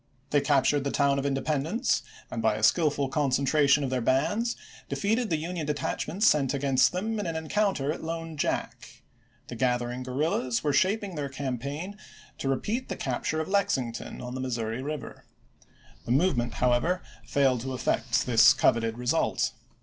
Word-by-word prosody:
They 145 - +4
captured 140 0 +2
the 140 - -1
town 140 0 +2
of 140 - -1
Independence 150 - 0 0.3
and, - - -3
by - - +3
Aug.11,1862. - - -4
a - - -7
skillful 145 -5 +3
concentration 140 +1 +2
of 130 - -2
their 130 -1 0
bands, 205 - +1 0.3
defeated 220 +3 0
the 160 - +1
Union 165 0 -4
detachments 165 +6 -1
sent 140 -7 +3
against 135 -2 +3
them 215 +4 -2
in 205 - -2
an 165 - -3
en 160 0 -4
counter 195 -9 +1
at 160 - -6
Lone 165 0 -4
Jack. 145 - -3 0.4
The 120 - -7
gathering 125 0 0
guerrillas 130 -1 -1
Aug.i6,i862. - - -21
were 145 -2 +1
shaping 195 +5 +1
their 145 -3 -3
campaign 140 - -4 0.4
to 135 - -2
repeat 215 - -2
the - - -2
capture 140 +4 -2
of 160 - -4
Lexington 135 - -1
on 125 0 -6
the 130 - -4
Missouri 115 -2 -2
River. 150 0 -6 0.8
The - - -1
move 150 +5 +3
ment, 120 0 -2
however, 125 +9 +1 0.2
failed 135 -4 +2
to 130 +1 -4
effect 125 -1 0
this 115 -3 +6
coveted 115 -1 +2
result. 125 0 +1
140 Hz, 175 wpm, -27 LUFS, 130-165 Hz, 0.8 s, this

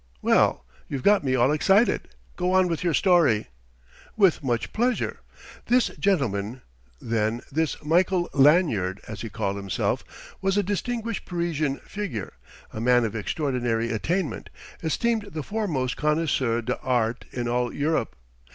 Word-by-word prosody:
"Well, - - +3 0.2
you've 135 -3 -4
got 205 -4 +4
me 130 -2 +1
all 125 +2 +3
excited. 195 +9 +3 0.3
Go 180 +1 0
on 185 -1 +4
with 170 0 -2
your 170 -3 +2
story." 160 - +3 0.7
"With 190 -7 +4
much 120 -3 -1
pleasure.... 245 +2 0 0.5
This 245 -1 +3
gentleman, 125 - -1 0.4
then, 115 0 -1
this 160 +2 0
Michael 175 +3 +2
Lanyard, 135 - +3
as 110 -1 -7
he 115 - -5
called 100 -2 -2
himself, 100 -4 -1 0.4
was 195 +1 +1
a 205 - +3
distinguished 230 +3 -3
Parisian 160 -5 -1
figure, 180 - -5 0.4
a 110 - -5
man 120 0 +4
of 110 0 -4
extraordinary 120 - -1
attainment, 165 - -2 0.3
esteemed 220 +6 0
the 155 -2 -4
foremost 155 - -2
connoisseur 145 -6 +1
d'art 125 -1 -1
in 120 -1 -3
all 120 0 0
Europe. 145 - -1
145 Hz, 135 wpm, -25 LUFS, 115-180 Hz, 0.7 s, got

